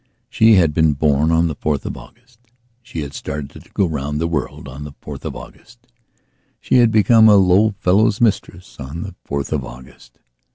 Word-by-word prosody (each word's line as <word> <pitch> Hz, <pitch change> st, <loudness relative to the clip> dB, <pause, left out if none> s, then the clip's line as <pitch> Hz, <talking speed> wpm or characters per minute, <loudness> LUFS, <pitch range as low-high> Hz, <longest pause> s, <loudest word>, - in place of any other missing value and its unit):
She 110 Hz, -2 st, +5 dB
had 85 Hz, -5 st, +3 dB
been 80 Hz, -1 st, +2 dB
born 75 Hz, +1 st, +1 dB
on 80 Hz, +1 st, +2 dB
the 80 Hz, -, -4 dB
4th 75 Hz, -2 st, -2 dB
of -, -, -5 dB
August; 120 Hz, 0 st, -17 dB, 0.4 s
she 100 Hz, -9 st, -7 dB
had 70 Hz, -1 st, -7 dB
started 70 Hz, -1 st, -6 dB
to -, -, -15 dB
go 100 Hz, -, +1 dB
round 75 Hz, -2 st, -3 dB
the 85 Hz, -, -1 dB
world 75 Hz, -4 st, -4 dB
on 70 Hz, +2 st, -9 dB
the 75 Hz, -1 st, -9 dB
4th -, -, -10 dB
of -, -, -5 dB
August; 120 Hz, +1 st, -14 dB, 0.7 s
she -, -, +1 dB
had 120 Hz, -2 st, +5 dB
become 110 Hz, 0 st, +5 dB
a 105 Hz, -, +6 dB
low 100 Hz, +2 st, +3 dB
fellow's 105 Hz, +3 st, +2 dB
mistress 95 Hz, -7 st, -2 dB
on 70 Hz, +5 st, -6 dB
the -, -, -8 dB, 0.2 s
4th 70 Hz, -1 st, -3 dB
of -, -, -1 dB
August. 60 Hz, -1 st, -14 dB
85 Hz, 195 wpm, -19 LUFS, 75-110 Hz, 0.7 s, a